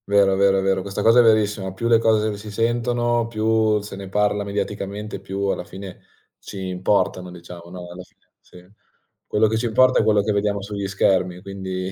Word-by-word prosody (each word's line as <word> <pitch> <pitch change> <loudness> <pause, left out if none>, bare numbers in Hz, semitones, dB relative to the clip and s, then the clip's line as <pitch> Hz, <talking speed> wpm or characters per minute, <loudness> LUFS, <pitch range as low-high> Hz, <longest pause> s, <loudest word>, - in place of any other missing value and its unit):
Vero, 100 -1 +4
vero, 95 0 +3
è - - +1
vero. 95 0 +1
Questa 100 +1 -4
cosa 115 +2 +6
è - - +7
verissima. 105 -4 +2
Più 115 +5 -3
le 115 -1 +5
r - - -1
cose 110 -2 +1
si 105 +1 -9
sentono, 120 +1 0
più 110 -1 +1
se 105 -1 -9
ne 95 -1 -8
parla 105 +1 +1
mediaticamente, 100 +1 -4
più 95 +1 -6
alla 100 - -1
fine 95 +1 -10 0.4
ci - - -10
importano, 90 0 0
diciamo, 85 -1 -11
no, 90 0 -9
alla 90 +1 -9
fine, - - -30
sì. 90 0 -17 0.6
Quello 105 +1 +2
che 110 +1 0
ci 120 +2 -1
importa 130 +3 +4
è - - +2
quello 105 -1 +3
che 105 - 0
vediamo 100 0 0
sugli 100 0 -4
schermi, 95 -2 +1
quindi 95 -1 -5
100 Hz, 200 wpm, -22 LUFS, 95-110 Hz, 0.6 s, è